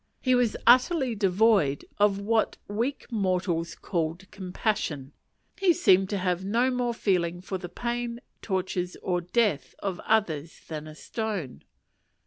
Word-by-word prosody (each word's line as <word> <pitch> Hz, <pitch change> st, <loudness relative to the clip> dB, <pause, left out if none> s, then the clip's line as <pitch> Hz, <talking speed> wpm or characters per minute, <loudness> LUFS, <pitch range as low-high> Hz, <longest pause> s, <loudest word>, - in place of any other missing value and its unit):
He 255 Hz, -, +2 dB
was 245 Hz, -3 st, +2 dB
utterly 255 Hz, +2 st, +5 dB
devoid 195 Hz, -7 st, +3 dB
of 205 Hz, -1 st, +4 dB
what 220 Hz, +2 st, +1 dB
weak 230 Hz, +7 st, -2 dB
mortals 180 Hz, -5 st, 0 dB
call 165 Hz, -3 st, -2 dB
"compassion." 180 Hz, -, -2 dB, 0.5 s
He 380 Hz, -3 st, +5 dB
seemed 190 Hz, -, +4 dB
to 205 Hz, -, -1 dB
have 180 Hz, -1 st, -1 dB
no 235 Hz, +6 st, +2 dB
more 245 Hz, -2 st, -1 dB
feeling 175 Hz, -5 st, 0 dB
for 190 Hz, +1 st, -5 dB
the 175 Hz, -1 st, -7 dB
pain, 235 Hz, +4 st, -3 dB, 0.2 s
tortures, 185 Hz, -2 st, -2 dB
or 180 Hz, -1 st, 0 dB
death 180 Hz, -, 0 dB
of 190 Hz, -3 st, -3 dB
others 170 Hz, -8 st, 0 dB
than 155 Hz, -1 st, -6 dB
a 155 Hz, -, -10 dB
stone. 200 Hz, -, -4 dB
195 Hz, 135 wpm, -27 LUFS, 175-230 Hz, 0.5 s, utterly